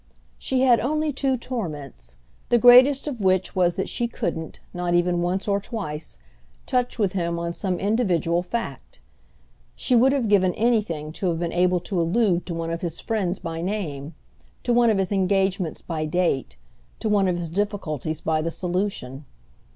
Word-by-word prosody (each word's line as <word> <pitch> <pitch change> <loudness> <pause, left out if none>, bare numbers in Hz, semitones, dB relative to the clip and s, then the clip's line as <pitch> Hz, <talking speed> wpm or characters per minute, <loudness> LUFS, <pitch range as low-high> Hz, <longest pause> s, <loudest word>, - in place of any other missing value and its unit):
She 260 -1 0
had 250 -3 +5
only 305 +3 0
two 270 -1 0
torments; 150 - -6 0.3
the 240 - +5
greatest 255 +4 +7
of 255 -7 -4
which 185 -1 +1
was 175 -2 +2
that 190 - -2
she 240 - -2
couldn't, 160 -8 -4
not 175 -1 -1
even 175 0 +2
once 185 +3 -1
or 200 -1 +2
twice, 165 - -6 0.5
touch 250 -1 0
with 200 -5 +1
him 170 -2 -1
on 170 0 -3
some 185 0 -2
individual 180 -6 +1
fact. 180 - -5 0.8
She 250 - +1
would 255 +3 +5
have 270 -5 0
given 190 -3 +3
anything 210 -10 0
to 185 - -3
have 165 - -1
been 170 0 -3
able 180 0 +2
to 185 -2 -1
allude 180 +1 +1
to 170 - -3
one 165 0 -3
of 165 - -3
his 170 -2 -4
friends 195 -5 -1
by 165 0 -5
name, 165 -6 -4 0.5
to 240 - +1
one 240 -1 +5
of 215 - +2
his 190 -1 -1
engagements 190 -3 0
by 155 -2 -3
date, 155 - -1 0.4
to - - -2
one 205 -2 +3
of 180 -1 0
his 175 -1 -3
difficulties 160 - -3
by 155 -1 0
the 165 - -1
solution. 175 -7 -3
185 Hz, 175 wpm, -24 LUFS, 165-220 Hz, 0.8 s, greatest